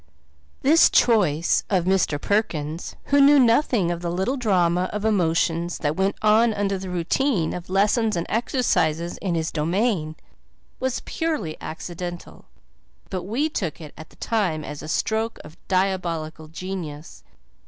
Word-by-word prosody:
This 315 +5 +6
choice 180 -9 +3
of 185 -4 +1
Mr. 185 -6 +1
Perkins, 165 -5 -2 0.2
who 285 - +6
knew 285 +1 +7
nothing 235 - +3
of 170 0 -4
the 175 - -2
little 190 +10 -1
drama 185 -7 +1
of 210 0 -3
emotions 170 -4 +1
that 150 0 -1
went 190 +2 0
on 220 +1 +4
under 200 -1 -1
the 190 0 -6
routine 180 - 0
of 180 0 -7
lessons 210 +3 +2
and 170 0 -2
exercises 175 - 0
in 180 -4 -2
his 160 -1 -1
domain, 165 0 0 0.6
was 260 -1 -2
purely 300 - -2
accidental, 175 +2 -7 0.7
but 185 -2 -3
we 245 +10 0
took 190 - -4
it 155 -3 -10
at 160 - -11
the - - -21
time 185 -9 -1
as 150 -1 -7
a - - -8
stroke 220 +7 -1
of 150 +2 -13
diabolical 170 -5 -1
genius. 160 - -7
185 Hz, 145 wpm, -23 LUFS, 165-220 Hz, 0.7 s, knew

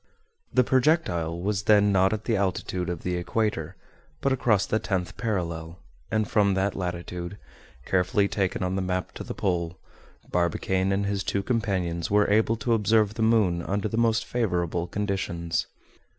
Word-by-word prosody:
The 125 - +4
projectile 125 - +1
was 100 +2 -1
then 105 -1 +5
not 95 0 +4
at 110 0 -2
the 115 - +1
altitude 95 -2 -1
of 85 -2 -4
the 90 -1 -1
equator; 90 -3 -1 0.4
but 140 - +1
across 115 -6 +2
the 110 - 0
tenth 90 -2 -2
parallel, 85 -7 -3 0.3
and 110 0 0
from 100 -4 +3
that 95 +1 0
latitude, 90 +1 -4 0.5
carefully 95 +2 +2
taken 95 -2 -1
on 90 +1 -1
the 95 - 0
map 90 0 -2
to - - -7
the - - -6
pole, 85 -3 -1 0.5
Barbicane 95 +2 +1
and 100 +1 +1
his 100 -1 -1
two 100 0 -1
companions 95 -7 -1
were 105 0 +4
able 110 +2 +3
to 120 +1 0
observe 110 -1 +3
the 110 - -4
moon 110 -6 +3
under 100 +4 -1
the 110 - -4
most 115 -1 +2
favorable 90 -7 -1
conditions. 85 -4 -2
95 Hz, 165 wpm, -26 LUFS, 90-110 Hz, 0.5 s, then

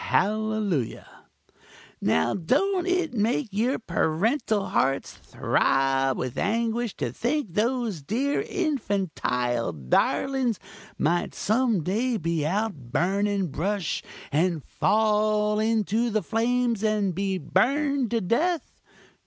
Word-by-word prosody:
hallelujah!) 210 - 0 1.0
Now 80 0 +2
don't 350 - +1
it 365 -4 0
make 230 +3 0
your 230 +7 +1
parental 205 - 0
hearts 135 +1 0
throb 135 0 +1
with 125 -2 -3
anguish 230 +1 0
to - - -3
think 250 - -2
those 230 - 0
dear 265 - 0
infantile 190 - -1
darlings 230 - +1 0.4
might 175 +3 0
some 220 -4 +1
day 225 +8 0
be 165 -4 -1
out 210 +5 0 0.2
burning 195 +3 +1
brush 185 +5 -2 0.3
and 160 0 +1
fall 210 0 +2
into 220 +1 +1
the 215 -2 0
flames 235 +2 0
and 210 -3 +1
be 195 +1 -1
burned 275 - +1
to 230 0 0
death! 320 - -1
215 Hz, 105 wpm, -26 LUFS, 175-240 Hz, 1.0 s, Now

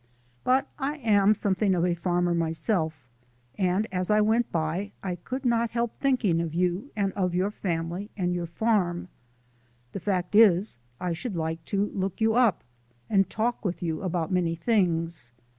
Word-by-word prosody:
But 265 +2 +2
I 285 +2 -2
am 210 -5 +4
something 195 -1 +1
of 175 0 +1
a 180 - +2
farmer 175 0 0
myself, 160 - 0 0.5
and 190 +3 +1
as 180 -1 -1
I 210 0 +4
went 220 +3 +2
by 170 +5 -2
I 185 -2 -2
could 255 +9 -6
not 235 -1 +2
help 235 0 -1
thinking 240 -12 +2
of 165 -1 -4
you 180 +8 0
and 200 -2 0 0.2
your 185 +3 +1
family 175 +1 -3
and 180 -2 0
your 175 -1 -2
farm. 180 -2 0 0.8
The - - -5
fact 180 0 -1
is, 205 - +5 0.2
I 180 -1 -1
should 190 +5 -4
like 160 0 -3
to 200 0 0
look 190 -1 -3
you 220 0 +3
up, 235 -4 +3 0.5
and 195 -2 +3
talk 235 +2 -1
with 180 -3 -3
you 160 -2 -2
about 175 -3 -2
many 175 -2 +1
things. 165 - 0
185 Hz, 165 wpm, -27 LUFS, 170-215 Hz, 0.8 s, is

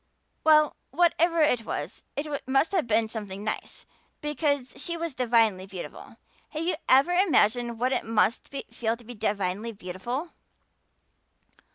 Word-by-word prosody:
"Well, 305 -1 +5
whatever 340 -1 +3
it 250 -7 +3
was - - -5
it 285 - -2 0.2
must 270 +4 +2
have 360 -10 +1
been 220 0 +2
something 205 -3 -6
nice 215 - -4 0.3
because 285 -3 -1
she 340 0 -2
was 335 -2 -3
divinely 225 -7 +2
beautiful. 190 -2 -9 0.3
Have 310 +1 -4
you 350 +1 +1 0.2
ever 270 +7 +6
imagined 245 - +3
what 250 +2 +1
it - - +1
must 225 +1 +1
feel 275 - -6 0.3
like - - -6
to 240 - -17
be 245 - -8
divinely 205 0 -1
beautiful?" 220 - -5
245 Hz, 145 wpm, -27 LUFS, 215-305 Hz, 0.3 s, ever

